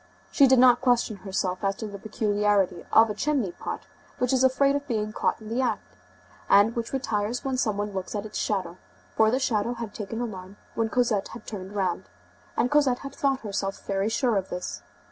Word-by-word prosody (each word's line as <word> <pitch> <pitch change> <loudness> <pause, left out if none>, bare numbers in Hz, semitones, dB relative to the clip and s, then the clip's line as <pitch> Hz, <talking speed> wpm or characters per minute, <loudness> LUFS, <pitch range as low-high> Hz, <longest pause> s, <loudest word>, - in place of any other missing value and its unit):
She 280 - +6
did 260 0 +5
not 245 -1 +6
question 245 -4 +2
herself 190 -1 -3
as 195 0 +1
to 220 - -6
the 200 -2 -7
peculiarity 205 -4 +1
of 225 -1 +6
a - - -2
chimney 255 -3 0
pot - - -6 0.4
which 250 +1 +1
is 260 0 +3
afraid 275 +2 +4
of 285 0 -3
being 215 -4 -2
caught - - 0
in 215 -1 -10
the 235 +3 0
act, 210 - -2 0.5
and 205 +3 +5
which 230 -1 -3
retires 235 -3 -2
when 265 -1 0
some 215 -5 0
one 205 0 -3
looks 190 +2 -4
at 205 0 -3
its 215 - -5
shadow, 185 -4 -2 0.4
for 220 0 +5
the 250 - +2
shadow 235 -2 0
had 230 -3 -6
taken 210 +1 -5
the 240 - -1
alarm 190 -2 -9 0.2
when 225 -1 0
Cosette 230 -5 +1
had 230 - -10
turned 195 -1 -7
round, 185 -3 -1 0.5
and 245 - +1
Cosette 280 -4 +3
had 275 - -6
thought 275 -1 0
herself 195 -2 -4
very 195 +1 0
sure 235 -1 +1
of 190 -1 -2
this. 90 - -5
215 Hz, 210 wpm, -26 LUFS, 200-245 Hz, 0.5 s, She